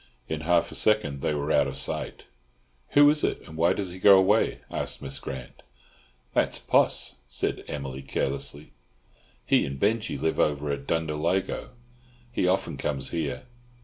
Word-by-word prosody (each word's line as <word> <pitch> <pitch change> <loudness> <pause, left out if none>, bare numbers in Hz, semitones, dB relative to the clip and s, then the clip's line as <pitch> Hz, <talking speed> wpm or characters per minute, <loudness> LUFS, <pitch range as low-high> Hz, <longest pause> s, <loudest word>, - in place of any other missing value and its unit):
In 80 -1 -3
half 85 +2 +2
a - - -8
second 105 -11 +1
they 75 - 0
were 75 +1 -2
out 70 -2 +4
of 65 0 -5
sight. 65 - -2 0.7
"Who 145 0 +8
is 150 0 -1
it? - - 0
and 80 - -11
why 85 +3 +3
does 95 -2 -3
he 90 - -9
go 100 0 +8
away?" 95 0 +3
asked - - -3
Miss 70 -1 -6
Grant. 65 -2 -8 0.7
"That's - - +1
Poss," - - +1
said 60 - -2
Emily 70 -2 -5
carelessly. 70 +2 -2 0.7
"He - - +4
and 70 -1 -5
Binjie 110 +4 0
live 80 - 0
over 75 -1 +1
at 70 - -4
Dunderalligo. 80 +8 -1 0.6
He 105 - 0
often 95 +1 0
comes 70 -1 -3
here. 80 -4 -3
75 Hz, 160 wpm, -27 LUFS, 70-95 Hz, 0.7 s, Who